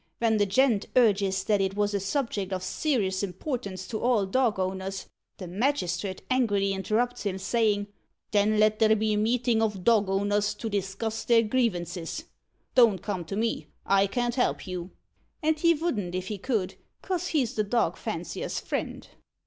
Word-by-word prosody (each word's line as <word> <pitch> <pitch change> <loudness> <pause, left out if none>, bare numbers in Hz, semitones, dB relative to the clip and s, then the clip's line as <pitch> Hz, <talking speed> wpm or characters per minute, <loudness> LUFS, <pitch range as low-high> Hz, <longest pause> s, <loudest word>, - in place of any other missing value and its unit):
Ven 225 -2 +2
the 205 -1 +2
gent 225 0 +2
urges 200 -5 +3
that 205 0 +2
it 195 0 -1
was 205 0 0
a 200 - +1
subject 200 -2 -2
of 185 -1 -2
ser'ous 200 -9 0
importance 195 - -4
to 220 - -4
all 235 -5 +2
dog 230 +1 +1
owners, 190 +1 -3 0.3
the 185 - -7
magistrit 190 -3 -1
angrily 205 -6 +2
interrupts 220 +6 -1
him, 195 -2 -2
sayin' 210 0 +1 0.5
'Then 210 +1 +3
let 215 0 +3
there 220 0 +5
be 215 0 +1
a - - +1
meetin' 230 +1 +2
of 210 -4 -1
dog 215 -3 +4
owners 205 +1 +1
to 220 +1 -5
discuss 200 +3 -2
their 230 -1 +4
grievances. 195 -8 -1 0.5
Don't 225 -8 +5
come 195 -4 -3
to 180 - -5
me. 225 +2 -1 0.2
I 195 0 +4
can't 240 +3 -1
help 250 0 0
you.' 180 -1 -5 0.5
And 310 0 +2
he 335 +1 +5
vouldn't 215 - -2
if 185 0 -3
he 210 -2 -4
could, 210 -4 -2 0.3
'cos 360 -2 -2
he's 275 -10 0
the 215 - 0
dog 230 +3 +1
fancier's - - -4
friend." - - -4
210 Hz, 170 wpm, -27 LUFS, 195-235 Hz, 0.5 s, there